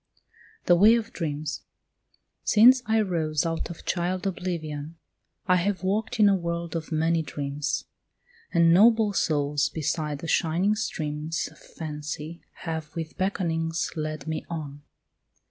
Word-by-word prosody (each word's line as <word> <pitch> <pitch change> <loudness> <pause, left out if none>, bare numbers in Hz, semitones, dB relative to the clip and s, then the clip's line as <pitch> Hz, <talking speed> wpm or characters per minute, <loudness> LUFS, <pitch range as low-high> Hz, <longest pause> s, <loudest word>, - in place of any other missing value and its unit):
THE 175 - +6
WAY 210 +6 +7
OF 230 -1 -3
DREAMS 155 -2 -3 0.8
Since 245 +4 +6
I 220 0 +3
rose 160 -6 0
out 165 0 -2
of 170 - -9
child 180 +1 -1
oblivion 165 -5 -4 0.5
I 180 -1 +4
have 190 +1 -1
walked 220 +5 -1
in 210 - +7
a 200 - +5
world 170 -1 -3
of 165 0 -4
many 165 +1 +2
dreams, 145 0 -3 0.7
And 170 -1 +5
noble 220 +2 +5
souls 145 -5 +1
beside 150 -1 -2
the 165 - -7
shining 175 +6 +2
streams 160 -7 -3
Of - - -19
fancy 155 +1 -6 0.2
have 160 -2 -4
with 160 -1 -5
beckonings 165 -4 -1
led 155 -2 -4
me 160 0 -3
on. 145 -4 -6
165 Hz, 135 wpm, -26 LUFS, 155-185 Hz, 0.8 s, WAY